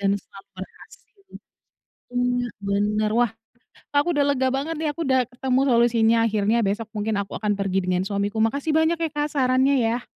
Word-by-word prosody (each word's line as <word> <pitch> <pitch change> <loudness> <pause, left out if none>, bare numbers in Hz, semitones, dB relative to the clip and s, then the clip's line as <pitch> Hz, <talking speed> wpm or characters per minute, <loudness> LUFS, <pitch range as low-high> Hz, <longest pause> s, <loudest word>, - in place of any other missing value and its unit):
dan 200 0 +1
selalu 195 0 -14
berhasil. 190 - -13 0.9
Benar 245 0 -1
benar. 205 +2 0
Wah, 240 -2 +3 0.6
Kak 285 - +1
aku 350 - -1
udah 290 -1 +2
lega 260 -1 +1
banget 285 +5 -2
nih. 315 - -1
aku 335 - -4
udah 260 -1 +3
ketemu 255 +1 0
solusinya 235 -2 +3
akhirnya, 215 +1 +1
besok 210 +3 -2
mungkin 210 +1 -1
aku 195 - -7
akan 210 -1 0
pergi 195 -1 0
dengan 180 0 +1
suamiku, 200 +1 -2
makasih 280 +7 -1
banyak 320 +1 +3
ya 325 - +1
Kak 295 0 0
sarannya 260 0 +3
ya. 235 +2 -1
235 Hz, 175 wpm, -23 LUFS, 205-265 Hz, 0.9 s, Wah